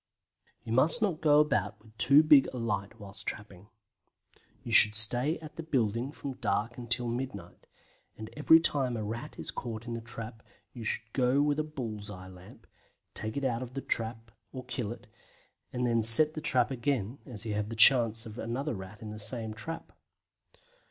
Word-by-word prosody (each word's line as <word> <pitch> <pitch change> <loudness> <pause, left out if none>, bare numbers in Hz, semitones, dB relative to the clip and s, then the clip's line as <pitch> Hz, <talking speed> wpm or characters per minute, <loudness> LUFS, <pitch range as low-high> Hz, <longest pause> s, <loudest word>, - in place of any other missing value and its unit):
You 110 - -5
must 150 - +4
not 180 -7 -1
go 150 -1 +5
about 150 -1 0
with 110 0 -20
too 140 +4 +6
big 150 -3 +6
a 130 - -7
light 105 -4 -3
whilst 100 -1 -10
trapping. 100 -2 -7 1.0
You 120 - -7
should 105 -2 +7
stay 120 +8 +3
at 155 -1 -11
the - - -4
building 125 -4 -1
from 140 -3 -7
dark 115 +3 -2
until 120 0 -1
midnight, 120 -7 -6 0.5
and 110 0 -9
every 160 +2 +6
time 135 -7 0
a 110 - -4
Rat 110 +3 -6
is - - -5
caught 115 -2 -6
in 120 - -5
the 115 - -5
trap 115 -1 -6 0.3
you 120 - -8
should 110 +1 -4
go 130 +1 +2
with 145 0 0
a - - +1
bull's 115 -9 -7
eye 95 -2 -10
lamp, 90 0 -15 0.5
take 110 +4 -5
it 140 - -2
out 120 -2 -1
of 125 0 -8
the 135 - -3
trap 115 -1 -3 0.2
or 130 -1 -8
kill 125 -4 -4
it, 120 - -10 0.7
and 125 0 -2
then 115 -1 +1
set 115 +8 +7
the 155 - -6
trap 125 -6 +2
again, 130 -2 -2
as 115 -4 -7
you 110 - -3
have 105 0 -3
the 115 - -6
chance 115 -1 +5
of 110 +1 -9
another 130 +6 -3
Rat 95 +1 -9
in 105 - -7
the 105 - -8
same 110 0 -3
trap. 165 +10 -8
115 Hz, 190 wpm, -29 LUFS, 110-135 Hz, 1.0 s, should